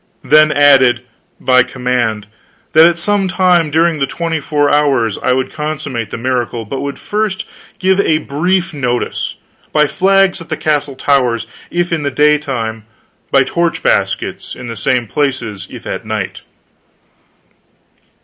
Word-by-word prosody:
Then 155 0 +5
added, 130 -4 +4 0.4
by 125 0 +4
command, 120 -4 -1 0.5
that 160 +2 +8
at 170 - -2
some 195 +2 0
time 180 -3 +2
during 160 +1 +2
the 135 - +1
twenty 165 +2 -2
four 145 0 0
hours 135 -8 +2
I 125 - +1
would 130 0 -2
consummate 145 -7 -4
the - - -5
miracle, 120 -1 -2
but 135 +6 -5
would 140 0 -4
first 210 -2 -2 0.3
give 190 +1 +2
a 160 -5 +3
brief 175 +5 -1
notice; 125 -4 -2 0.4
by 150 -1 +4
flags 190 +2 +2
on 165 - -10
the 155 - -3
castle 145 -3 -1
towers 125 -5 +1 0.2
if 175 0 -1
in 160 - 0
the 145 - -1
daytime, 135 -6 0 0.4
by 135 -1 +4
torch 170 +5 -1
baskets - - -1
in - - -9
the 115 -1 -6
same 120 +3 0
places 115 -7 -2
if - - -10
at - - -4
night. - - -4
145 Hz, 150 wpm, -15 LUFS, 125-165 Hz, 0.5 s, that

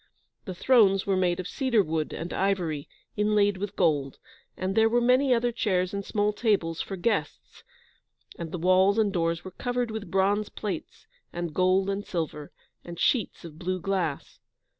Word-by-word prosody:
The 185 -4 -6
thrones 200 -4 +4
were 195 - +1
made 180 -1 +1
of 180 - -4
cedar 250 -5 +1
wood 155 -2 -2
and 170 +2 -5
ivory, 175 -7 -1 0.3
inlaid 210 -1 +2
with 200 +1 -5
gold, 145 -6 +1 0.4
and 185 +1 -2
there 220 +2 +4
were 240 +2 +3
many 255 +3 +3
other 240 0 +2
chairs 190 -5 0
and 200 0 -3
small 210 +1 0
tables 195 -8 0
for 195 - -5
guests, 190 -5 -3 0.7
and 165 -2 -6
the 180 - -3
walls 185 +4 +4
and 210 -3 +2
doors 165 -1 0
were 185 - -7
covered 245 +2 -2
with 215 -4 -6
bronze 195 +3 +1
plates, 195 -7 -6 0.3
and 170 -2 -4
gold 185 +2 +2
and 200 +1 -2
silver, 155 -5 -4 0.3
and 170 -1 -9
sheets 225 -8 0
of 160 -1 -11
blue 185 +1 -2
glass. 180 -6 -3
190 Hz, 170 wpm, -27 LUFS, 175-210 Hz, 0.7 s, thrones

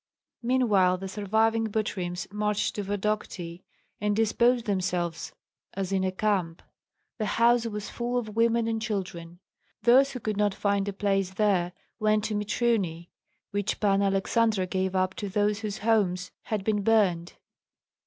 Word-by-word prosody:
Meanwhile 215 -7 +3
the 195 +1 -6
surviving 220 +3 +1
Butryms 185 -5 -2
marched 210 0 0
to 205 - -3
Vodokty, 195 -4 -3 0.4
and 210 0 0
disposed 235 +2 +2
themselves 180 -4 -2 0.4
as 195 -1 -3
in 190 -1 +1
a 185 - 0
camp. 185 -4 -1 0.6
The 215 - -1
house 235 0 +4
was 210 -2 -5
full 240 +1 -2
of 215 -3 -4
women 230 0 +2
and 225 -1 -1
children. 180 -6 -4 0.5
Those 265 +4 +5
who 250 - -5
could 215 -2 -3
not 205 -2 +1
find 200 -1 0
a 200 - -2
place 195 -2 0
there 185 -4 +1 0.3
went 215 -1 +2
to 220 0 -2
Mitruny, 205 -5 -1 0.4
which 205 0 -2
Panna 200 -1 +2
Aleksandra 195 +1 +1
gave 185 +1 -2
up 185 0 +1
to 205 - -4
those 205 +1 +1
whose 210 -2 -4
homes 195 -5 +1
had 215 -3 -2
been 210 0 +1
burned. 195 -5 +2
205 Hz, 150 wpm, -27 LUFS, 190-220 Hz, 0.6 s, Those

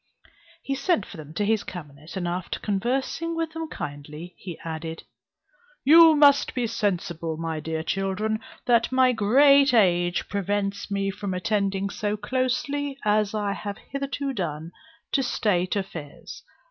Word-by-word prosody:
He 275 - -2
sent 290 +5 +1
for 190 - -11
them 155 -1 -10
to 205 - 0
his 215 0 +1
cabinet, 155 -1 -9
and 175 -2 -2
after 175 0 -3
conversing 260 +11 -1
with 330 -1 -2
them 325 0 -4
kindly, 150 - -7
he 175 -4 -8
added: 160 0 -5 0.8
"You 320 +2 +8
must 285 -1 +5
be 250 -2 0
sensible, 175 -7 -2
my 165 -1 -3
dear 160 0 -3
children, 195 +5 -1 0.3
that 235 0 +3
my 260 0 +4
great 275 +5 +5
age 175 -4 +3
prevents 200 0 -2
me 195 -1 -1
from 195 -1 -4
attending 200 -1 0
so 210 +1 -2
closely 260 +5 -1
as 210 0 +2
I 205 -1 -1
have 200 0 -5
hitherto 275 0 -4
done 165 - -4 0.4
to 275 - +2
state 190 -8 0
affairs. 170 -7 -6
205 Hz, 145 wpm, -25 LUFS, 175-255 Hz, 0.8 s, You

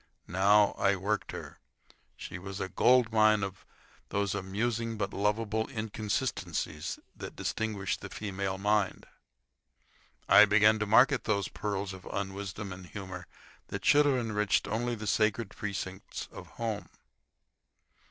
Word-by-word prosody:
Now 100 +3 +4
I 100 0 +3
worked 100 +2 -2
her. - - -8 0.6
She 85 - -7
was 95 +1 -7
a 95 - -3
gold 120 +3 +4
mine 110 -1 +5
of 95 -1 -6 0.4
those 100 -1 0
amusing 115 +4 -2
but 100 -1 -2
lovable 105 +2 0
inconsistencies 110 -7 -3 0.2
that - - -8
distinguish 105 -4 -2
the - - -9
female 100 -2 -3
mind. 105 0 +1 1.2
I 105 - +9
began 105 +1 +5
to 105 - -1
market 125 +5 +5
those 100 -3 0
pearls 100 -2 -3
of 95 0 -11
unwisdom 100 0 -4
and 90 -1 -10
humor 95 -1 -7 0.4
that - - -6
should 145 0 +6
have 135 -2 +3
enriched 105 -4 +1
only 120 +2 -1
the 110 -1 -7
sacred 110 +1 +1
precincts 100 -2 -5
of - - -10
home. 110 -3 -4
105 Hz, 135 wpm, -30 LUFS, 95-110 Hz, 1.2 s, I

